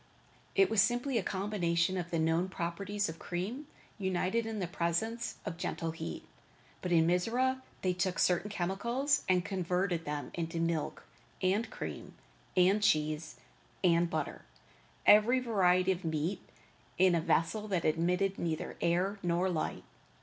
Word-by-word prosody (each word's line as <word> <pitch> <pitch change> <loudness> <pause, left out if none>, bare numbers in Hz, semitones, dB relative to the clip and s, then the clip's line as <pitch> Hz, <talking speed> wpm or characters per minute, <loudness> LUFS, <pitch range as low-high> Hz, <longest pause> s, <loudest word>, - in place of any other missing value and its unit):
It 390 -1 +6
was 220 -3 +5
simply 240 +3 +1
a - - 0
combination 185 -3 0
of 175 -2 -3
the 170 - -1
known 165 +3 +1
properties 195 +4 -2
of 160 0 -7
cream 210 +12 -4 0.3
united 190 +4 0
in 220 -1 -4
the 190 - -1
presence 195 +7 -2
of 165 - -4
gentle 165 -1 -3
heat. 85 - -6 0.6
But 180 - -3
in 165 -2 +5
Mizora 240 +10 +1 0.2
they 185 -1 +2
took 180 0 -1
certain 180 +3 +2
chemicals 235 +9 0
and 180 0 +3
converted 180 -2 -1
them 145 0 -4
into 165 -1 -3
milk, 165 -2 -1 0.4
and 200 +5 +1
cream, - - -7 0.4
and 190 +3 +5
cheese, 155 - +1 0.5
and 170 -1 +4
butter, - - -3 0.6
and 210 - +10
every 240 +5 +2
variety 190 -6 +3
of 185 0 -3
meat, 165 +4 -1 0.6
in 185 0 +5
a 170 - +2
vessel 210 +7 +1
that 185 -5 -1
admitted 180 +5 +1
neither 160 -2 -3
air 185 +4 +1
nor 175 +2 +1
light. 160 - -2
180 Hz, 150 wpm, -32 LUFS, 170-205 Hz, 0.6 s, and